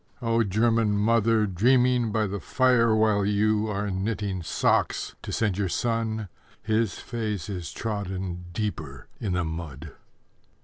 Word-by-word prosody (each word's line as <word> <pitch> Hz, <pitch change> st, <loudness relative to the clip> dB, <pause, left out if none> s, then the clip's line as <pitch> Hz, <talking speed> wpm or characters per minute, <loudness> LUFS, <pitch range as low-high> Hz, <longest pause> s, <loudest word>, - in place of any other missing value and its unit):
O 115 Hz, -2 st, +1 dB
German 110 Hz, +1 st, +2 dB
mother 110 Hz, +1 st, +3 dB
dreaming 125 Hz, +4 st, +3 dB
by 110 Hz, 0 st, +1 dB
the 100 Hz, 0 st, -3 dB
fire, 125 Hz, -3 st, +3 dB
While 110 Hz, -2 st, +3 dB
you, 105 Hz, +1 st, +2 dB
are 100 Hz, 0 st, -2 dB
knitting 95 Hz, -1 st, -2 dB
socks 80 Hz, -, 0 dB
to -, -, -6 dB
send 105 Hz, -4 st, 0 dB
your 95 Hz, -3 st, 0 dB
son 110 Hz, +1 st, -1 dB, 0.4 s
_His 110 Hz, -1 st, +1 dB
face 110 Hz, -6 st, -4 dB
is 90 Hz, -6 st, -5 dB
trodden 95 Hz, -5 st, -4 dB
deeper 85 Hz, -, -4 dB
in 100 Hz, -5 st, -2 dB
the 90 Hz, -1 st, +1 dB
mud. 80 Hz, -2 st, -6 dB
105 Hz, 135 wpm, -26 LUFS, 95-115 Hz, 0.4 s, mother